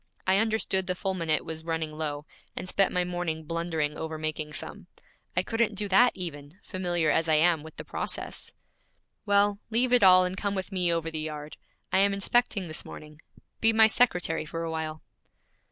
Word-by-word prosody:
I 190 +1 +4
understood 215 -4 0
the 180 - -1
fulminate 175 -5 -1
was 160 -1 -5
running 160 -1 -2
low, 150 -1 -4 0.3
and - - -5
spent 195 +1 +2
my 180 - +1
morning 175 -3 -3
blundering 160 -2 -2
over 160 0 -4
making 155 -1 -4
some. - - -6 0.5
I - - +3
couldn't 225 -2 0
do 205 +1 -2
that 245 +6 +5
even, 150 -3 -7
familiar 175 -4 0
as 165 0 +1
I 155 - +5
am 165 0 +3
with 160 +1 -12
the - - -6
process.' - - -4 0.8
'Well, 200 0 +3
leave 245 +3 +1
it 250 - +6
all 185 -1 +7
and 180 +1 -3
come 200 +1 -2
with 190 +1 -4
me 180 -2 +1
over 165 -1 -1
the 160 - -3
yard. 150 -1 -6 0.4
I - - +5
am 200 0 +3
inspecting 200 -1 +1
this 155 - -6
morning. 150 0 -11 0.4
Be 225 - +4
my 220 0 +7
secretary 180 -9 +2
for 165 +2 -5
a 165 - -3
while.' 160 -1 -4
175 Hz, 185 wpm, -27 LUFS, 155-195 Hz, 0.8 s, all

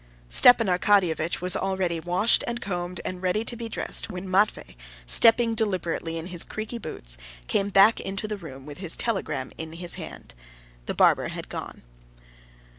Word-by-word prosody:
Stepan 230 - +6
Arkadyevitch 180 -4 +1
was 180 0 +1
already 190 -3 -1
washed 180 +7 +2
and 240 0 -3
combed 180 -4 -4
and 185 -1 -5
ready 190 +4 -1
to 240 - -2
be 230 -1 -7
dressed, - - -1
when 185 -1 -7
Matvey, 185 - 0 0.3
stepping 230 - +4
deliberately 180 -6 -2
in 165 - -3
his 175 -2 -2
creaky 220 +2 -6
boots, - - -3 0.3
came 200 - 0
back 200 +3 +5
into 195 +2 -3
the 210 - -3
room 135 -7 -11
with 145 +1 -10
the 185 -3 -5
telegram 160 - +1
in 160 0 -6
his 175 +1 +1
hand. - - -10 0.5
The - - -3
barber - - +3
had - - -8
gone. - - -8
185 Hz, 165 wpm, -25 LUFS, 165-215 Hz, 0.5 s, Stepan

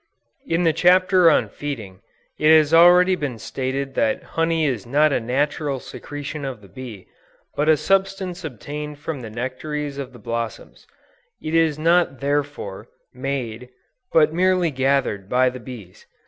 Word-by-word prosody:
In 165 +2 +1
the 165 -2 +3
chapter 180 +1 +5
on - - +3
Feeding, 110 -10 -7 0.4
it 155 - +3
has 155 0 +2
already 180 +2 +7
been 140 -8 -4
stated 135 +5 -4
that 275 -1 0
honey 165 -1 0
is 120 -7 -2
not 145 +3 +3
a - - +2
natural 140 +3 -1
secretion 145 +3 -7
of 135 -4 -5
the 100 - -15
bee, 120 -5 -10 0.5
but 150 +2 +1
a 155 - +5
substance 190 +1 -1
obtained 150 +1 -6
from 150 -2 -5
the 115 - -7
nectaries 140 +5 -4
of 135 -2 -6
the 125 - -13
blossoms; 115 0 -6 0.5
it 155 - -5
is 165 -2 +3
not 165 -3 +2
therefore, 140 -8 -3 0.3
made, 125 -3 -4 0.4
but 155 -1 +4
merely 180 -1 +2
gathered 130 -7 0
by 125 +1 +3
the 125 - -8
bees. 115 -8 -11
145 Hz, 150 wpm, -22 LUFS, 125-165 Hz, 0.5 s, already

